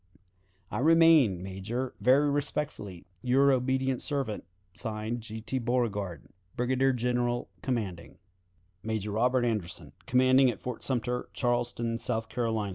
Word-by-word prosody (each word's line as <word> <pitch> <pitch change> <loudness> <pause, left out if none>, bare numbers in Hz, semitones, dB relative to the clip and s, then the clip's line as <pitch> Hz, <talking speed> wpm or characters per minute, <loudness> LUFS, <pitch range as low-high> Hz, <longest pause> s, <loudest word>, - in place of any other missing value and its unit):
"I - - -2
remain, 155 - +5
Major, 110 +7 -4
very 135 +4 +5
respectfully, 140 - -3 0.2
"Your 135 +4 +4
obedient 130 0 +1
servant, 135 -8 -2 0.3
(Signed) 110 +2 -4
"G. 110 0 -8
T. 130 +4 -2
Beauregard, 105 - -1 0.3
"Brigadier 130 +2 +2
General 120 0 -1
commanding. 100 -10 -3 0.6
"Major 110 -2 -3
Robert 125 +3 +2
Anderson, 105 -7 -3
"_Commanding 130 +1 +5
at 120 - -4
Fort 125 -2 -5
Sumter, 125 -1 -2
Charleston 120 -2 0
Harbor, 115 +2 -2 0.2
S. - - -4
120 Hz, 120 wpm, -29 LUFS, 110-130 Hz, 0.6 s, remain